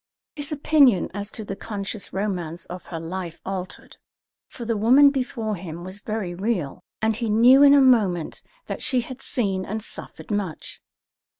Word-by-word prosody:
His 290 -2 -4
opinion 285 - +4
as 205 +1 -4
to 220 - -6
the 195 - -5
conscious 205 0 -5
romance 180 -4 -3
of 180 +1 -9
her 165 - -5
life 170 +1 -6
altered, 190 0 -6 0.5
for 235 - -9
the 230 0 0
woman 260 +7 +6
before 245 -5 -2
him 170 -1 -8
was 185 +2 -7
very 210 -4 -4
real, 185 -6 -2 0.2
and 220 0 +2
he 230 0 -2
knew 240 +6 +6
in 285 0 +8
a 280 - +6
moment 205 -11 +2 0.2
that - - -5
she 255 -3 +1
had 255 +2 -9
seen 195 -6 -1
and 215 +3 -4
suffered - - -7
much. 200 -7 -3
210 Hz, 170 wpm, -24 LUFS, 185-240 Hz, 0.5 s, in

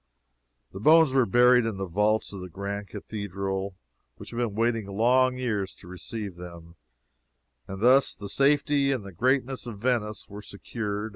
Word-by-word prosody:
The 95 - -8
bones 155 +4 +5
were 130 -3 +3
buried 125 +3 +5
in 110 -3 -3
the 95 - -3
vaults 105 +5 0
of 95 - -7
the 90 - -8
grand 100 +3 -5
cathedral, 100 -2 -5 0.4
which - - -11
had 115 - -7
been 120 -4 -1
waiting 115 -2 0
long 125 +5 +2
years 105 -7 -2
to 90 - -16
receive 100 +1 -7
them, 85 -1 -11 0.9
and 95 +1 -7
thus 130 +4 +4
the 100 - -8
safety 140 +2 +2
and 125 -7 -2
the 100 - -8
greatness 130 +6 0
of 110 -4 -7
Venice 110 -2 -1
were 105 +1 -9
secured. 105 +1 -5
105 Hz, 165 wpm, -26 LUFS, 100-125 Hz, 0.9 s, bones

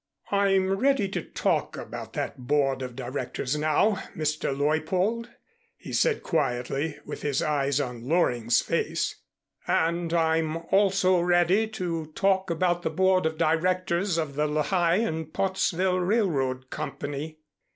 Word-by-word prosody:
"I'm 195 -1 +3
ready 270 -2 +2
to - - -2
talk - - -1
about - - -7
that - - -3
Board 135 -2 +2
of 125 -2 -6
Directors 130 +1 -3
now, 155 +7 +2 0.2
Mr. 155 -2 -1
Leuppold," 170 - 0 0.5
he - - -9
said 460 -3 +2
quietly, 140 0 -1
with - - -7
his 145 -2 0
eyes 140 -2 +1
on 125 -3 -4
Loring's 120 -9 +2
face, - - -1 0.5
"and 170 +1 +1
I'm 160 -1 +1
also 190 -2 +4
ready 175 +5 +3
to 175 -7 -3
talk 190 -1 +2
about 175 +1 +1
the 160 - -1
Board 185 +1 +2
of 160 0 -4
Directors 175 +2 +1
of 155 -4 -2
the 150 +2 0
Lehigh 165 +3 +1
and 160 -7 -1
Pottsville 185 -1 0
Railroad 145 - 0
Company." 150 +1 -5
165 Hz, 130 wpm, -26 LUFS, 145-185 Hz, 0.5 s, also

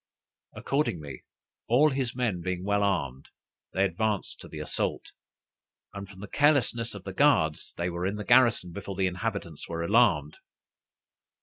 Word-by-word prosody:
Accordingly, 80 - -2 0.4
all 145 +6 +4
his 130 -3 -2
men 115 -8 -1
being 90 0 -3
well 100 +1 +1
armed, 70 -10 -1 0.4
they 95 - +2
advanced 105 +2 -2
to - - -11
the - - -9
assault; - - -3 0.8
and, 100 -1 -7
from 95 0 -13
the 105 - -7
carelessness 130 -6 +2
of 100 - -9
the 95 - -6
guards, 95 - +2
they 85 +1 -1
were 85 +2 -2
in 100 - -2
the 105 -1 -6
garrison 120 -7 +4
before 100 +1 -6
the 95 0 +1
inhabitants 90 -3 -4
were 85 0 -3
alarmed. 85 -8 +3
100 Hz, 150 wpm, -28 LUFS, 85-115 Hz, 0.8 s, all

